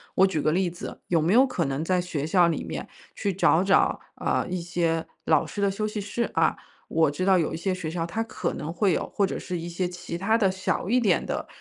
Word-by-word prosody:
我 190 - +6
举 160 -6 -1
个 155 - +2
例 185 0 +1
子， 175 +1 -8
有 165 -3 +2
没 170 +6 +2
有 255 +3 +7
可 180 -10 -1
能 135 +3 -2
在 180 +1 +1
学 165 -5 -3
校 175 0 +4
里 160 - -2
面 75 -4 -5 0.3
去 200 - -1
找 175 -1 +3
找， 195 0 +3 0.2
呃， - - 0
一 180 -1 -2
些 170 -2 -1 0.2
老 155 -2 +3
师 205 - -5
的 200 - +3
休 215 +2 -2
息 210 0 -4
室 215 +4 -2
啊， - - +2 0.3
我 160 -3 +3
知 185 +6 -2
道 190 -1 +5
有 165 - 0
一 - - -3
些 185 +3 -1
学 180 -4 -4
校 165 0 -2
它 220 +7 -3
可 225 - -3
能 155 +2 -4
会 200 0 +2
有， - - -2
或 200 - +3
者 190 - -3
是 180 - -4
一 170 - -5
些 175 +1 -1
其 175 -1 -6
它 220 +5 +2
的 195 -4 +3
小 190 0 -2
一 250 +3 +4
点 200 -7 +2
的， - - -3
180 Hz, 275 characters per minute, -26 LUFS, 165-195 Hz, 0.3 s, 有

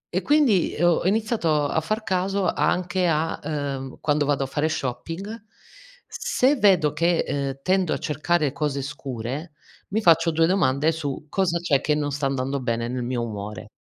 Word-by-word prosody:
E 185 - +2
quindi, 285 - +3
ho 175 -1 +3
iniziato 195 -8 +1
a 160 - 0
far 215 +4 -2
caso 190 0 0
anche 180 0 +1
a, 160 0 0
uhm, 140 -3 -4
quando 145 -1 +1
vado 140 -2 +1
a - - -1
fare 145 +3 -1
shopping, 165 - -4 0.6
se 270 +4 +1
vedo 185 - +4
che, 170 +2 +2
ehm, 135 -1 -3
tendo 185 -2 +2
a - - -1
cercare 150 0 0
cose 145 -3 -2
scure 140 +2 -5 0.4
mi 220 +3 0
faccio 165 -2 +5
2 165 0 +3
domande 155 -4 +2
su 150 -3 -4
cosa 180 -3 +1
c'è 150 -6 +1
che 150 - +1
non 145 -1 -1
sta 140 0 -1
andando 135 +1 -2
bene 115 -2 -2
nel 125 0 -3
mio 120 -1 -2
umore. 105 -2 -7
155 Hz, 170 wpm, -24 LUFS, 135-180 Hz, 0.6 s, faccio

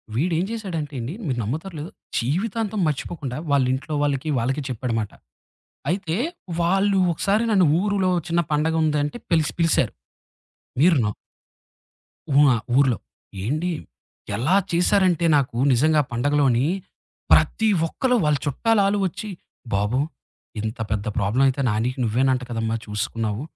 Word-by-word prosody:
వీడేం 165 +6 +1
చేశాడంటండి 155 - -4
మీరు 130 -5 -1
నమ్మతారో, 155 - -4
లేదో 155 +4 -6 0.3
జీవితాంతం 205 - -1
మర్చిపోకుండా 145 -3 -3
వాళ్ళింట్లో 135 +2 +1
వాళ్ళకి, 145 +1 -1
వాళ్ళకి 130 +5 -1
చెప్పాడమాట. 115 -4 -2 0.8
అయితే 175 -2 -1 0.5
వాళ్ళు 195 +3 +2
ఒకసారి 200 +7 +1
నన్ను 190 -4 +5
ఊరులో 200 -2 +1 0.2
చిన్న 170 +1 +2
పండగుందంటే 150 +1 +1
పిలిసి 160 -3 +2
పిలిసారు. 165 -1 +2 0.9
మీరు 165 +2 +5
న - - +1 1.3
ఉ - - +7
ఆ! - - +2 0.2
ఊర్లో. 135 -5 +4 0.5
ఏండి, 155 - -1 0.6
ఎలా 145 - +2 0.2
చేశారంటే 175 0 +3
నాకు 130 -4 0 0.2
నిజంగా 155 +5 +4
పండగలోని 130 0 +2 0.7
ప్రతి 220 - +4 0.2
ఒక్కళు 250 +8 0
వాళ్ళ 150 -1 +3
చుట్టాలాలు 200 - +2
ఒచ్చి, 190 +4 -7 0.4
"బాబు! 105 +6 +1 0.6
ఇంత 110 +1 -4
పెద్ద 105 -1 -1
ప్రాబ్లమయితే 130 +7 +2
నానికి 115 +5 -1
నువ్వేనంట 125 +3 +1
కదమ్మా 115 -1 -1
చూసుకున్నావు. 105 +1 -3
145 Hz, 110 wpm, -23 LUFS, 125-180 Hz, 1.3 s, ఉ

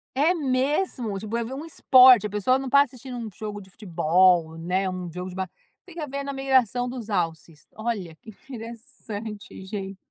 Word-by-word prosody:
É 295 +6 +4
mesmo? 260 - -1
Tipo, 215 +3 -5
é 235 - -1
ver 245 +4 -6
um 295 +4 -6
esporte, 255 -7 +6
a - - -11
pessoa 210 +6 +1
não 270 - -5
está 280 +2 +6
assistindo 255 -1 -9
um 230 -2 -5
jogo 210 +2 -6
de 190 -2 -15
futebol, 175 -3 +2
né, 185 +3 -1
um 185 -2 -5
jogo 180 +2 -6
de 180 - -10
ba 190 -1 -3 0.4
venha 335 -4 -6
ver 280 +1 -4
na 280 - -4
migração 260 -3 +1
dos 245 -3 -6
alces, 165 -5 -3
olha, 210 -7 -4
que - - -13 0.2
interessante 225 -3 -8
gen 195 -1 -6
220 Hz, 185 wpm, -25 LUFS, 190-260 Hz, 0.4 s, esporte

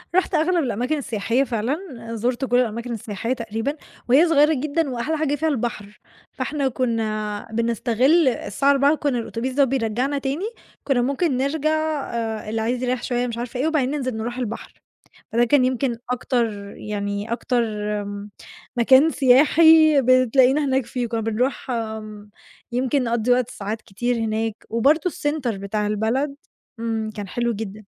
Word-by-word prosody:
رُحت 375 +1 +2
أغلب 335 +2 +2
الأماكن 250 +5 -1
السياحية 235 -1 0
فعلًا، 245 +2 -1 0.4
زُرت 240 +4 -1
كل 245 -1 +2
الأماكن 235 0 -2
السياحية 225 +2 -3
تقريبًا، 230 +3 -3 0.3
وهي 290 +8 +6
صغيرة 310 -1 +4
جدًا 300 +2 -1
وأحلى 260 +6 -2
حاجة 295 -2 0
فيها 320 +3 -1
البحر، 220 -6 -4 0.3
فإحنا 285 -3 -2
كُنّا 215 -4 -2
بنستغل 235 - +2
الساعة 260 +2 +1
16:00 280 +2 +4
كُنّا 285 -5 -1
الأتوبيس 235 +3 -4
ده 280 +2 +4
بيرجّعنا 260 +1 0
تاني، 280 +7 -2 0.4
كُنّا 265 -4 +1
ممكن 275 +2 0
نرجع 285 +3 0 0.4
آآ 225 -2 -3
اللي 220 +1 -1
عايز 240 +3 -1
يرَيّح 250 -1 -1
شوية 245 0 -1
مش 235 -1 -5
عارفة 245 +1 -5
إيه 285 - +1
وبعدين 290 -5 +1
ننزل 255 -5 -2
نروح 240 +2 -4
البحر. 235 -3 -5 0.6
فده 235 +2 +3
كان 260 +1 +4
يمكن 255 -1 0 0.2
أكتر 245 -1 0 0.3
يعني 205 +1 -4
أكتر 240 +1 0 0.4
م 205 0 -7 0.5
مكان 260 +6 +6
سياحي 310 +2 +6
بتلاقينا 255 +3 +4
هناك 265 -2 +1
فيه، 240 0 -3
كُنّا 230 -1 -2
بنروح 240 +5 -1
آمم، 215 -3 -5 0.4
يمكن 255 +2 +1
نقضّي 235 0 0
وقت 250 -1 +2
ساعات 215 -3 -5
كتير 240 +5 -2
هناك، 225 -1 -2
وبرضه 290 +10 +2
الcenter 290 -7 -2
بتاع 200 +2 -2
البلد 230 +7 -1 0.4
إمم، 225 -1 -2
كان 205 -2 -5
حلو 235 +4 -1
جدًا. 215 0 -6
245 Hz, 150 wpm, -22 LUFS, 225-275 Hz, 0.6 s, وهي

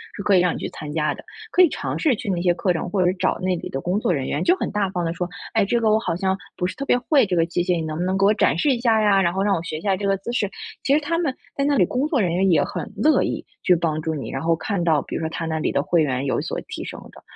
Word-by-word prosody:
是 200 - -6
可 200 -2 +4
以 - - +6
让 180 -1 +2
你 - - -4
去 - - -4
参 150 -1 -8
加 150 -1 0
的。 - - -12 0.3
可 365 - +4
以 350 - +7
尝 - - -4
试 295 -7 +3
去 - - -8
那 175 -1 -1
些 175 -1 +2
课 180 +1 +1
程， 165 - -3
或 200 - 0
者 - - +3
是 - - -4
找 - - +1
那 185 0 0
里 - - -6
的 135 - -3
工 185 +4 0
作 180 - 0
人 135 -5 -1
员 - - -1
就 360 +2 +4
很 - - -3
大 205 -2 0
方 175 -2 -2
的 165 - -1
说： 175 +1 -3 0.2
“哎， - - +3
这 235 +4 +1
个 220 -2 +2
我 215 - +4
好 195 - -2
像， 190 +2 0 0.2
不 180 - -1
是 185 - -3
特 275 - -4
别 245 - +3
会 270 +2 +3
这 180 - 0
个 165 - +3
机 175 +1 -1
械， 180 0 +1
你 165 - -2
能 155 - -4
不 - - 0
能 185 +1 0
给 195 - +3
我 205 - +5
展 205 - +2
示 280 - +2
一 245 - 0
下 225 -3 +3
呀， 205 -2 +4
然 170 -2 +2
后 190 +2 -1
让 200 -2 +2
我 165 - -2
学 155 - -4
一 155 - -8
下 195 -1 +1
这 200 +1 -3
个 195 0 +2
姿 235 +5 -6
势。” 205 -5 0 0.3
其 275 - 0
实 290 - +5
他 330 +3 -1
们， 320 -6 0 0.2
在 275 - 0
那 285 0 +2
里 180 - +5
工 255 - -1
作 300 -4 +1
人 180 -6 +1
员 190 +2 +2
也 160 -5 +4
很 - - -5
乐 310 +1 +3
意， - - -3 0.2
去 180 - +5
帮 160 -2 -1
助 160 0 -2
你， 140 - -5
然 135 - -3
后 165 0 +2
看 195 +1 -2
到 160 -4 +3
比 - - -7
如 - - -1
说 160 - -2
他 165 - -4
那 160 -1 -2
里 - - 0
的 140 - +1
会 170 0 +2
员 130 -1 -1
有 135 - 0
所 - - -4
提 - - -6
升 - - -7
的。 - - -15
185 Hz, 375 characters per minute, -22 LUFS, 165-215 Hz, 0.3 s, 以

